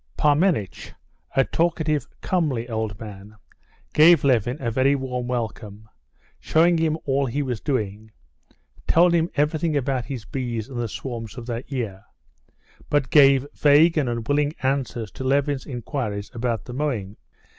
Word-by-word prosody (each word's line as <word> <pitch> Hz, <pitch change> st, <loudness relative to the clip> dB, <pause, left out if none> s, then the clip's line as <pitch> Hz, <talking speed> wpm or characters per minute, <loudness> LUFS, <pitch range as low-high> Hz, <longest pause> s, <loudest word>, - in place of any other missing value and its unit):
Parmenitch, 150 Hz, -, +1 dB, 0.4 s
a 135 Hz, -, +5 dB
talkative, 160 Hz, -4 st, 0 dB
comely 145 Hz, -10 st, -1 dB
old 110 Hz, -4 st, -3 dB
man, 105 Hz, -1 st, -10 dB, 0.6 s
gave 160 Hz, 0 st, +6 dB
Levin 125 Hz, -1 st, +2 dB
a 120 Hz, -3 st, -2 dB
very 130 Hz, +4 st, +3 dB
warm 125 Hz, -2 st, -3 dB
welcome, 110 Hz, -3 st, -5 dB, 0.5 s
showed 170 Hz, +1 st, +3 dB
him 160 Hz, -1 st, +1 dB
all 140 Hz, -1 st, +1 dB
he 145 Hz, +5 st, -1 dB
was 125 Hz, -6 st, -3 dB
doing, 110 Hz, -5 st, -3 dB, 0.8 s
told 175 Hz, +1 st, +5 dB
him 170 Hz, 0 st, +2 dB
everything 150 Hz, +1 st, +1 dB
about 130 Hz, -3 st, -1 dB
his 120 Hz, -4 st, -6 dB
bees 120 Hz, -2 st, -4 dB
and 130 Hz, -3 st, -6 dB
the 120 Hz, -, -1 dB
swarms 115 Hz, 0 st, -6 dB
of 120 Hz, -, -7 dB
that 120 Hz, +3 st, -5 dB
year; 105 Hz, -8 st, -4 dB, 0.9 s
but 145 Hz, -2 st, +1 dB
gave 140 Hz, -2 st, +6 dB
vague 150 Hz, +3 st, +5 dB
and 145 Hz, -6 st, +1 dB
unwilling 145 Hz, +6 st, 0 dB
answers 130 Hz, -5 st, -1 dB
to -, -, -7 dB
Levin's 140 Hz, 0 st, 0 dB
inquiries 120 Hz, -5 st, -4 dB
about 115 Hz, -3 st, -2 dB
the 125 Hz, -, -8 dB
mowing. 120 Hz, -9 st, -2 dB
130 Hz, 145 wpm, -23 LUFS, 115-145 Hz, 0.9 s, gave